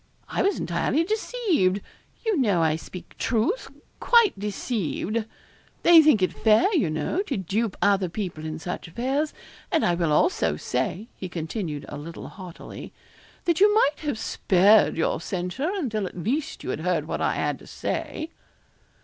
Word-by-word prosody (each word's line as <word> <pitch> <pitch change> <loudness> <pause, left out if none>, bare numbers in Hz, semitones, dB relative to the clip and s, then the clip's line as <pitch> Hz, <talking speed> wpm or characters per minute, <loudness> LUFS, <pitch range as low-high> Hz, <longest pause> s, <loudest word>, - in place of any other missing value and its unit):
I - - -1
was 400 - +1
entirely 320 - 0
deceived 380 - +1 0.5
you 445 -2 +2
know 205 - +2
I 155 -1 +2
speak 175 +3 -10
truth 295 - 0 0.3
quite 470 -4 +5
deceived. 210 +1 -2 0.6
They 340 -2 +9
think 300 -11 +4
it 185 - +1
fair, 225 - +3
you 270 - +2
know, 155 - -1
to 350 - -3
dupe 200 +3 -1
other 195 -3 +3
people 175 -4 -5
in 155 0 -4
such 175 +3 -5
affairs; 265 - -1 0.4
and 325 -4 +2
I 175 - +3
will 170 -2 0
also 335 - +2
say,' 210 +5 -2
he 185 - -6
continued, 160 -2 -4
a 145 - -7
little 165 +3 -8
haughtily, 185 -3 -10 0.5
'that 340 -2 +2
you 410 +2 +6
might 295 -9 +3
have 290 -7 -2
spared 205 -2 +4
your 160 - 0
censure 185 - -2
until 230 - -2
at - - -10
least 275 - -2
you - - -3
had - - -3
heard - - 0
what - - -3
I - - +1
had - - -1
to - - -15
say.' 315 +1 -4
215 Hz, 165 wpm, -25 LUFS, -, 0.6 s, They